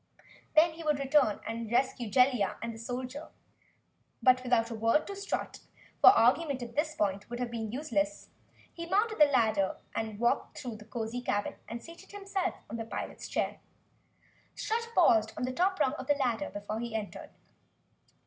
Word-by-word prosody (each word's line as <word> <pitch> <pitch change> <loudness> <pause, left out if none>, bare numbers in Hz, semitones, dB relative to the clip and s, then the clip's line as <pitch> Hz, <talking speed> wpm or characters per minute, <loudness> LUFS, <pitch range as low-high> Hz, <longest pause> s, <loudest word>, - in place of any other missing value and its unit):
Then 320 +2 +6
he 330 +1 -9
would 300 -2 +2
return 275 -5 +2
and 225 0 -4
rescue 245 -2 +1
Jellia 250 -5 +3
and 230 0 -4
the 225 - -10
soldier. 255 +5 -5 1.0
But, 255 0 +5
without 240 -2 +1
a - - -2
word 230 +7 +2
to 400 - -6
Strut, 400 +1 -4 0.4
for - - +10
argument 280 -4 +3
at 235 0 -9
this 305 +1 0
point 200 0 -1
would 240 - -4
have 245 -1 -2
been 225 -2 -4
useless, 295 +3 -2 0.4
he 335 0 -7
mounted 430 +2 +1
the 300 - +9
ladder, 220 -8 +2 0.4
walked 235 +2 0
through 240 -4 -6
the 210 - -13
cozy 230 +2 -4
cabin 205 -4 -1 0.2
and 230 0 -6
seated 335 0 -13
himself 390 -2 -2
in 230 - -5
the 225 - -3
pilot's - - -6
chair. - - -1 1.0
Strut 460 +1 -2
paused 220 -11 +4
on - - -3
the 255 +1 -1
top 375 +5 +1
rung 275 -3 +2
of 260 -3 -7
the 290 - +4
ladder 265 0 -1
before 205 +2 -5
he 235 -1 -4
entered. 215 -2 -5
250 Hz, 175 wpm, -30 LUFS, 225-305 Hz, 1.0 s, for